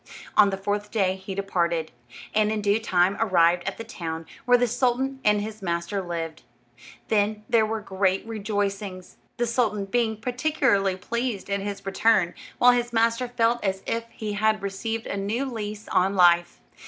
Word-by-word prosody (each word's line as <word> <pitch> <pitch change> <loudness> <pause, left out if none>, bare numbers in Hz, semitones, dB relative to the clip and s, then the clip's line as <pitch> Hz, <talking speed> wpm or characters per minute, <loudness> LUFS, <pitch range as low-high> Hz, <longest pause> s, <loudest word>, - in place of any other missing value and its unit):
On 205 -1 +6
the 195 - -3
fourth 205 +1 -2
day 190 -4 +1
he 190 0 -7
departed, 170 -4 -1 0.4
and 215 0 +2
in 215 -1 -1
due 205 +2 +3
time 190 -3 +2
arrived 175 -5 +3
at - - -3
the 230 - -6
town 165 -7 -6 0.2
where 245 0 +6
the 245 - +2
sultan 255 +3 0
and 210 -1 +3
his 215 0 -7
master 170 +2 -2
lived. 165 -3 -5 0.7
Then 210 0 +1
there 225 -2 +3
were 220 0 -3
great 190 -1 0
rejoicings; 200 -3 -3 0.2
the 240 - +1
sultan 225 -4 0
being 220 +1 0
particularly 245 -6 +1
pleased 220 +1 -3
at 200 - +1
his 200 0 -5
return, 195 -2 +2 0.2
while 250 - +7
his 240 0 0
master 230 +2 +2
felt 240 0 +1
as 190 -1 -1
if 230 0 -2
he 215 -2 -5
had 215 0 +1
received 225 +3 -3
a 200 - -3
new 210 +7 -1
lease 215 -4 -5
of 190 +2 +3
life. 175 -2 +4
205 Hz, 170 wpm, -25 LUFS, 190-230 Hz, 0.7 s, while